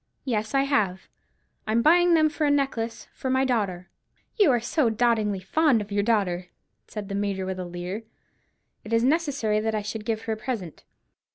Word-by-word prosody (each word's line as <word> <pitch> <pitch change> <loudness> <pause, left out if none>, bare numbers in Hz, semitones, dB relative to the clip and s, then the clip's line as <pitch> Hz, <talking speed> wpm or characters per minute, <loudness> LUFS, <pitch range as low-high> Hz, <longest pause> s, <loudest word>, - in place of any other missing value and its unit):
"Yes, 220 -1 -1
I 275 - +4
have. 205 -9 0 0.6
I 215 - 0
am 230 +1 +3
buying 350 +2 +5
them 310 -1 +5
for 305 0 -1
a - - +3
necklace 265 -5 -1
for 260 - -4
my 260 +1 +2
daughter." 195 -8 -1 0.5
"You 410 -8 +5
are 245 -3 +3
so 240 +2 +1
dotingly 220 -3 +1
fond 280 +5 +3
of 205 0 -7
your 205 0 +1
daughter!" 195 -5 0 0.4
said 210 -2 -6
the 200 - -5
Major 200 -1 -1
with 190 0 -4
a 180 - -4
leer. 180 +5 -6 0.8
"It 220 - -6
is 230 0 +3
necessary 275 -7 +1
that 220 0 -1
I 210 - -2
should 210 +1 -5
give 220 -1 -2
her 225 - -2
a - - -5
present." 215 - -5
220 Hz, 195 wpm, -25 LUFS, 200-265 Hz, 0.8 s, buying